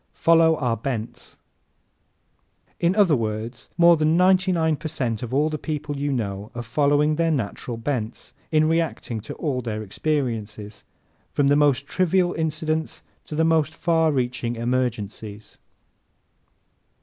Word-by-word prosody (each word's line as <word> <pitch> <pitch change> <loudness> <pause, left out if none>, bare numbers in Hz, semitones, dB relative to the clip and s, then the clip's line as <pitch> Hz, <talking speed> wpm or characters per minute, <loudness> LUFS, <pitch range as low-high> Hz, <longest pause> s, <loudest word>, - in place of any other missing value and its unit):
Follow 165 -1 +4
Our 120 -6 -1
Bents 115 -2 -5 1.3
¶ - - -35
In 175 +2 +2
other 195 -8 +5
words, 115 +1 -4
more 170 -1 +6
than 155 +2 +2
ninety 185 +1 +4
nine 160 -3 +2
per 150 +2 -6
cent 125 -8 -2
of 120 - -5
all 145 +4 +2
the 155 -1 -3
people 150 -2 -4
you 140 +1 -2
know 105 -5 -3
are 120 - -4
following 145 +5 +2
their 165 0 +2
natural 120 -3 -3
bents 115 -2 -4 0.2
in 155 0 +4
reacting 160 -8 -1
to 105 - -8
all 135 -5 -2
their 110 -2 -4
experiences 110 -4 -3 0.5
from 140 -1 +1
the 145 - +5
most 145 -2 +3
trivial 180 +2 +1
incidents 160 0 -2 0.2
to 150 - -6
the 160 +1 +2
most 160 -1 +2
far 165 -2 +2
reaching 125 -3 -1
emergencies. 115 -3 -3
145 Hz, 145 wpm, -23 LUFS, 115-160 Hz, 1.3 s, more